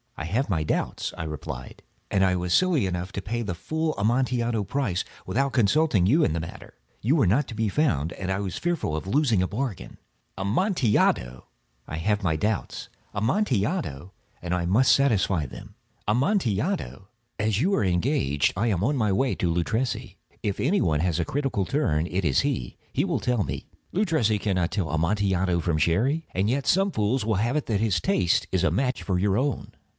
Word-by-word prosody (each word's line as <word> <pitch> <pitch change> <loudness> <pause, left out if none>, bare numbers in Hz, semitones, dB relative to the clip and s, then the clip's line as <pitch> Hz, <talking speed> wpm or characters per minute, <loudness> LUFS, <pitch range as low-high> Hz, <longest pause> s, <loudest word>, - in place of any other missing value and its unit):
"I 80 - -4
have 115 +10 -1
my 80 -5 +1
doubts," 75 - -2
I - - -4
replied; 70 -4 -7 0.3
"and 95 -1 +2
I 90 -1 +2
was 90 -1 -1
silly 175 - +3
enough 90 0 -3
to 100 - -3
pay 120 +4 -3
the 100 -5 -3
full 155 - -2
Amontillado 120 0 +1
price 100 -4 -1 0.2
without 135 +2 0
consulting 120 - +3
you 145 - +4
in - - +2
the 85 - -1
matter. 80 - -9 0.3
You 130 +8 +2
were 135 - +3
not 120 +11 +2
to 110 - -7
be 110 -1 0
found, 85 - +1
and 95 -1 -4
I 95 - 0
was 95 -3 -3
fearful 175 - -1
of 80 - -4
losing 120 -4 +2
a - - 0
bargain." 115 -2 -4 0.4
"Amontillado!" 105 - +1 0.4
"I 80 - -5
have 105 +5 0
my 85 -4 +1
doubts." 105 +5 -2 0.2
"Amontillado!" 110 - -1 0.3
"And 90 0 -3
I 90 -1 -1
must 110 +9 +4
satisfy 100 - +2
them." - - -11 0.3
"Amontillado!" 130 - 0 0.3
"As 105 0 +1
you 190 +6 +2
are - - +1
engaged, 90 - +1
I 110 +6 0
am 100 -5 0
on 140 +5 +1
my 110 -4 +1
way 125 +7 +1
to 85 - 0
Luchesi. 110 +9 -2 0.2
If 100 -2 -2
any 180 +10 +2
one 75 -3 +1
has 90 -1 0
a 85 - 0
critical 135 - -1
turn, 85 - 0
it 90 +2 -2
is 70 -5 +3
he. - - -2 0.2
He - - +1
will - - 0
tell 125 -4 +1
me—" - - -5 0.2
"Luchesi 160 - +1
cannot 95 -4 0
tell 95 -7 -1
Amontillado 90 +2 +1
from 85 -1 0
Sherry." 120 - +1
"And 95 +3 +1
yet 135 +3 0
some 195 +2 +3
fools 110 - 0
will 110 -1 +1
have 115 +7 0
it 150 - 0
that 105 -3 0
his 105 -6 +2
taste 90 0 +1
is 95 -1 +1
a 85 - +3
match 125 +8 0
for 95 -2 0
your 100 +1 +2
own." 135 +1 -2
105 Hz, 190 wpm, -25 LUFS, 90-130 Hz, 0.4 s, you